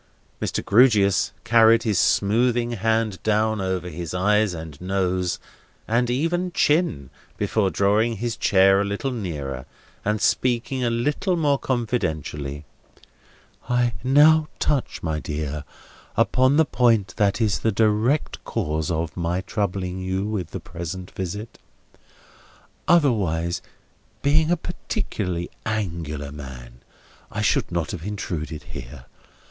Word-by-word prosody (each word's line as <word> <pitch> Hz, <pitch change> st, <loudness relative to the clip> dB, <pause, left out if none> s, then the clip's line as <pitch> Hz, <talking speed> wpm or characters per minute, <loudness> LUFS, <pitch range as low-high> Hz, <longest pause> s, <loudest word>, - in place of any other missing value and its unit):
Mr. -, -, -2 dB
Grewgious 100 Hz, -4 st, +4 dB
carried 115 Hz, -1 st, +5 dB
his 105 Hz, -6 st, +1 dB
smoothing 120 Hz, +3 st, +2 dB
hand 110 Hz, -2 st, 0 dB
down 110 Hz, 0 st, +1 dB
over 95 Hz, -2 st, -2 dB
his 85 Hz, +1 st, -5 dB
eyes 105 Hz, +1 st, +2 dB
and 80 Hz, -3 st, -9 dB
nose, 90 Hz, -1 st, 0 dB, 0.5 s
and 120 Hz, +2 st, +1 dB
even 170 Hz, +8 st, 0 dB
chin, 145 Hz, -, +1 dB, 0.3 s
before 105 Hz, -4 st, +1 dB
drawing 105 Hz, +5 st, +2 dB
his 120 Hz, +2 st, -2 dB
chair 95 Hz, 0 st, +4 dB
a -, -, +2 dB
little 100 Hz, +7 st, -2 dB
nearer, 75 Hz, -, -5 dB, 0.4 s
and 105 Hz, +1 st, 0 dB
speaking 125 Hz, +3 st, +1 dB
a 120 Hz, -, +2 dB
little 145 Hz, +10 st, 0 dB
more 145 Hz, -4 st, +2 dB
confidentially: 80 Hz, -, -2 dB, 1.0 s
"I 125 Hz, -1 st, +2 dB
now 150 Hz, +4 st, +5 dB
touch, 140 Hz, -4 st, -1 dB
my 80 Hz, -2 st, -1 dB
dear, 75 Hz, -1 st, -4 dB, 0.5 s
upon 130 Hz, +3 st, +3 dB
the 160 Hz, -, +5 dB
point 115 Hz, -8 st, +2 dB
that 100 Hz, 0 st, +2 dB
is 110 Hz, -4 st, +1 dB
the 110 Hz, -, +1 dB
direct 110 Hz, +7 st, +1 dB
cause 75 Hz, 0 st, -2 dB
of 80 Hz, -1 st, -2 dB
my 85 Hz, +1 st, -1 dB
troubling 95 Hz, -2 st, -2 dB
you 95 Hz, +1 st, -2 dB
with 105 Hz, -6 st, -2 dB
the -, -, -5 dB
present 85 Hz, +2 st, -7 dB
visit. 105 Hz, +5 st, -6 dB, 1.3 s
Otherwise, 95 Hz, -, +2 dB, 0.6 s
being 155 Hz, +3 st, +3 dB
a 175 Hz, -, +3 dB
particularly 100 Hz, -, -4 dB
Angular 80 Hz, -9 st, -3 dB
man, 60 Hz, -4 st, -10 dB, 0.5 s
I -, -, -3 dB
should -, -, +1 dB
not 85 Hz, -3 st, -1 dB
have 90 Hz, -5 st, -6 dB
intruded 85 Hz, -6 st, -4 dB
here. 65 Hz, 0 st, -9 dB
100 Hz, 125 wpm, -23 LUFS, 85-120 Hz, 1.3 s, carried